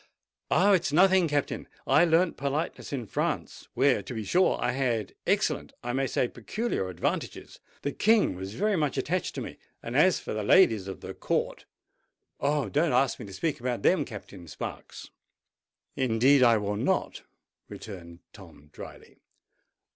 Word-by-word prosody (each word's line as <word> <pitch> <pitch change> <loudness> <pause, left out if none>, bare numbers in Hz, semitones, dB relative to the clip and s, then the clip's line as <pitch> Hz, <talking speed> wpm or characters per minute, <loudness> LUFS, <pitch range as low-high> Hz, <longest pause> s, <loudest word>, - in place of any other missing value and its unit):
"Oh! 205 - +4
it's 175 -6 +2
nothing, 185 +2 +5
Captain. 145 -2 -2 0.2
I 150 +6 +5
learnt 165 +1 +2
politeness 140 +4 -3
in 130 -5 -3
France, - - -3
where, 130 -3 +3
to 120 +5 -8
be 110 - -3
sure, 180 - +2
I - - 0
had 120 -5 -1
excellent—I 120 0 -1
may 135 +1 0
say 125 - 0
peculiar 125 - -3
advantages. 90 - -4 0.2
The 145 - -1
King 215 - +3
was 95 +3 -7
very 210 +1 +1
much 150 -6 -1
attached 175 +7 -2
to - - -4
me—and 115 - -9
as 175 +6 +4
for - - -6
the 110 - -2
ladies 110 - +4
of 95 - -7
the - - -7
Court—Oh! 145 -3 -4
don't 150 - +1
ask 130 +1 +2
me 120 - -8
to 95 - -10
speak 150 - -2
about 120 -1 -3
them, 185 - +3
Captain 100 -5 -10
Sparks!" 75 - -8 0.8
"Indeed 130 +2 +3
I 120 -3 +6
will 105 0 -2
not," - - -1 0.5
returned 85 -5 -10
Tom 75 +1 -15
drily. - - -12
130 Hz, 155 wpm, -27 LUFS, 110-160 Hz, 0.8 s, I